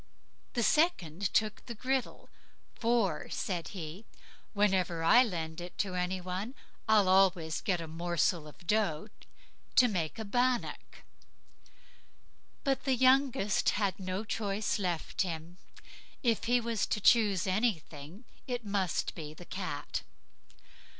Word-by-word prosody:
The 240 - +1
second 200 - +2
took 215 -1 0
the 235 - -6
griddle; 260 +3 -2 0.5
"for", 225 -9 0
said 175 -4 -3
he, 175 +1 -7 0.5
"whenever 190 -5 +1
I 235 +9 +7
lend 165 -8 -2
it 175 +1 -9
to 195 -3 -1
any 180 +1 -1
one, 185 +7 -5 0.3
I'll 210 -3 +5
always 185 -4 +3
get 180 -3 0
a 165 - -5
morsel 170 0 0
of 160 +4 -15
dough 210 -2 0 0.7
to 250 - +7
make 180 -4 -2
a 220 - -4
bannock." 245 +3 -1 1.6
But 270 -1 0
the 265 -2 +3
youngest, 255 -5 +3
he - - 0
had 200 -2 0
no 185 +2 -3
choice 210 -1 -1
left 175 -3 -2
him; 170 -1 -4 0.7
if 230 -3 +1
he 245 +1 +3
was 230 -2 -1
to - - -1
choose 205 -3 +4
anything 185 - -2 0.2
it 245 -3 -3
must 195 -6 -1
be 155 -2 -8
the 175 - -11
cat. 180 -7 -4
195 Hz, 130 wpm, -31 LUFS, 175-225 Hz, 1.6 s, I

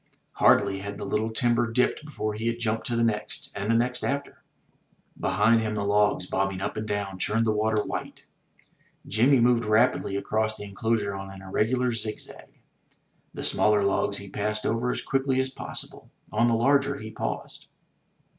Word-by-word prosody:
Hardly 95 0 +3
had 100 0 -6
the - - -5
little 110 +1 0
timber 120 +1 +2
dipped 125 +5 +1
before 110 -8 -4
he 110 +2 -3
had 115 0 0
jumped 110 -1 -1
to 120 - -1
the 115 - +2
next 105 -2 -2
and 100 +1 -4
the 115 - +4
next 125 +2 0
after. 140 +1 -3 0.8
Behind 115 +3 +3
him 110 -1 -2
the 105 - -1
logs, 105 -2 +2
bobbing 95 0 -1
up 95 - -3
and 110 0 -4
down, 100 -2 -3
churned 115 +4 +1
the 110 - +2
water 105 0 +1
white. - - -6 0.8
Jimmy 125 +6 +4
moved 120 0 +4
rapidly 110 -1 +2
across 110 +2 -1
the - - -7
enclosure 105 +1 -1
on 95 0 -6
an 95 0 -11
irregular 120 +6 +1
zig 110 -2 -4
zag. - - -12 0.8
The - - -5
smaller 105 -1 +3
logs 100 0 +1
he 100 - -8
passed 105 +2 -2
over 115 +2 0
as - - -2
quickly 135 -1 0
as 130 0 0
possible; - - -7 0.2
on 115 +2 +3
the 115 - +3
larger 140 +3 +2
he 110 -4 -8
paused. - - -5
110 Hz, 180 wpm, -26 LUFS, 105-120 Hz, 0.8 s, the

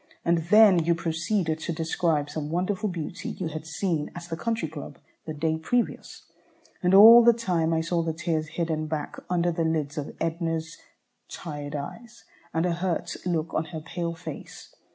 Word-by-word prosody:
And 170 0 +3
then 210 -5 +7
you 170 +1 +2
proceeded 165 0 -1
to 165 - -3
describe 160 -2 0
some 150 -1 -4
wonderful 185 +5 -1
beauty 175 0 -5
you 175 -4 -4
had 155 0 -7
seen 165 -1 -1
at 175 - -7
the 170 -1 -5
Country 225 0 -2
Club 150 -1 -9 0.3
the 155 - -3
day 160 +1 -1
previous, 240 +9 -2 0.6
and 180 +1 +3
all 230 +4 +10
the 235 0 +7
time 180 -8 0
I 160 0 +2
saw 170 +1 0
the 165 0 -1
tears 160 -1 -2
hidden 160 -1 -2
back 155 -1 -4
under 175 -1 +1
the 165 0 -1
lids 155 -2 -1
of 145 - -6
Edna's 165 -1 -2 0.5
tired 145 -3 -6
eyes, 230 +12 -8 0.3
and 165 +1 0
a 175 - +1
hurt 175 0 -2
look 165 -2 -1
on 160 - 0
her 160 0 -6
pale 170 +1 -4
face. 165 - -9
165 Hz, 175 wpm, -26 LUFS, 160-180 Hz, 0.6 s, all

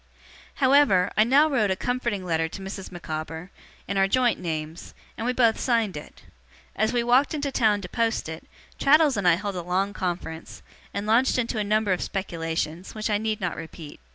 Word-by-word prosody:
However, 260 -9 +4
I 215 - +5
now 275 +7 +5
wrote 240 -9 +1
a 190 - +1
comforting 235 -3 -2
letter 165 -2 0
to 195 - -8
Mrs. 195 0 -7
Micawber, 160 0 -6 0.4
in 200 - -2
our 195 0 +4
joint 245 +3 +2
names, 160 -1 -5 0.2
and 225 - -4
we - - +2
both 235 -3 +2
signed 230 -6 +1
it. 150 - -10 0.5
As 220 +1 +1
we 240 -1 +1
walked 255 +6 +3
into 285 -2 -2
town 215 -5 +2
to 180 - -6
post 230 -1 -1
it, 160 0 -7 0.3
Traddles 295 -1 +5
and 200 -3 0
I 170 - +6
held 200 +2 -4
a - - -2
long 185 +3 -1
conference, 175 -4 -5 0.3
and 200 +1 -4
launched 230 +5 +3
into 230 -2 -1
a - - +1
number 210 -1 +1
of 180 - -3
speculations, 165 -2 -4
which 215 0 -2
I 205 - +2
need 220 0 -2
not 180 -4 -2
repeat. 160 -2 -9
205 Hz, 195 wpm, -25 LUFS, 175-235 Hz, 0.5 s, I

